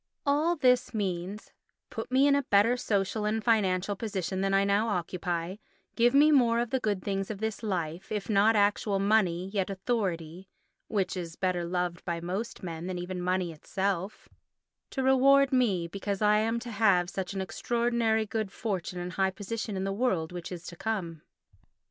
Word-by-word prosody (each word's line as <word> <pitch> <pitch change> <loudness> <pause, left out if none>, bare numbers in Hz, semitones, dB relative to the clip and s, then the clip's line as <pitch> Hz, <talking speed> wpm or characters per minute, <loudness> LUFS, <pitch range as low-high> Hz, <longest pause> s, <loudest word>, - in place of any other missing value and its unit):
All 300 +5 +2
this 250 -5 +2
means: 195 0 -3 0.4
"Put - - -6
me 265 +2 +4
in 285 - +5
a 280 - +3
better 225 -1 +3
social 210 -3 -1
and 215 +1 -1
financial 200 -4 +2
position 190 -3 -3
than 195 0 +1
I 195 0 +4
now 200 +3 +2
occupy; 180 -2 -2 0.4
give 240 +2 +3
me 300 +2 +6
more 240 -5 +4
of 240 -1 -2
the 265 - +1
good 205 -6 -1
things 195 -1 -2
of 215 - -4
this 220 +1 -3
life, 180 -4 -3
if 210 -2 -2
not 215 +1 +4
actual 205 0 +2
money 195 -3 +2
yet 195 -2 -1
authority 190 -4 -3 0.4
(which 195 -3 -1
is 170 -2 -5
better 180 -2 -1
loved 175 0 -2
by 170 -2 -2
most 190 +7 -4
men 170 -1 -5
than 185 -1 -3
even 180 +1 -4
money 180 -1 0
itself), 195 +5 -3 0.6
to 265 - -3
reward 270 +1 +5
me 200 -10 +2
because 200 +2 -4
I 210 0 +4
am 225 +2 0
to 240 -1 -7
have 195 -5 +3
such 190 +1 -4
an - - -2
extraordinary 235 +2 0
good 215 -2 -3
fortune 190 -5 -3
and 180 +1 -5
high 190 -1 +2
position 210 +1 -5
in 190 - -2
the 195 0 -1
world 190 -8 0
which 175 0 -7
is 175 -1 -7
to 175 - -8
come." 170 -6 -3
200 Hz, 180 wpm, -29 LUFS, 180-225 Hz, 0.6 s, me